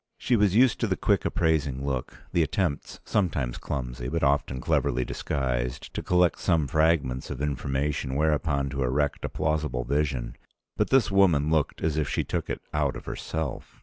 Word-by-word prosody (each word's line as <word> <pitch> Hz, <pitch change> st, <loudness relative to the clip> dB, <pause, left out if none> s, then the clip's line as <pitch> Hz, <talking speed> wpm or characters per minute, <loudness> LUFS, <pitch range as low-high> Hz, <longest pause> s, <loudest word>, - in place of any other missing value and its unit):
She 125 Hz, -, +1 dB
was 105 Hz, -3 st, +3 dB
used 125 Hz, +1 st, +5 dB
to -, -, +1 dB
the -, -, 0 dB
quick -, -, +1 dB
appraising 70 Hz, -5 st, 0 dB
look, 65 Hz, -3 st, -4 dB
the 85 Hz, -, +3 dB
attempts, 80 Hz, -1 st, -1 dB
sometimes 75 Hz, -, 0 dB
clumsy, 60 Hz, -3 st, -4 dB
but 80 Hz, +1 st, -1 dB
often 70 Hz, -2 st, +1 dB
cleverly 65 Hz, 0 st, +1 dB
disguised, 60 Hz, -4 st, -2 dB
to -, -, -3 dB
collect 90 Hz, -1 st, +2 dB
some 80 Hz, -5 st, +2 dB
fragments 75 Hz, -4 st, +1 dB
of 70 Hz, -, -5 dB
information 70 Hz, -1 st, -1 dB
whereupon 75 Hz, -2 st, +1 dB
to 70 Hz, 0 st, -3 dB
erect 70 Hz, +3 st, 0 dB
a -, -, -2 dB
plausible 75 Hz, -5 st, -1 dB
vision. 70 Hz, -3 st, -1 dB, 0.4 s
But -, -, 0 dB
this 135 Hz, -6 st, +4 dB
woman 85 Hz, -7 st, +4 dB
looked 80 Hz, -3 st, 0 dB
as 80 Hz, -1 st, 0 dB
if 75 Hz, -, 0 dB
she -, -, 0 dB
took -, -, -3 dB
it -, -, -3 dB
out 75 Hz, -2 st, +1 dB
of -, -, -8 dB
herself. 80 Hz, -2 st, -5 dB
75 Hz, 175 wpm, -27 LUFS, 65-80 Hz, 0.4 s, used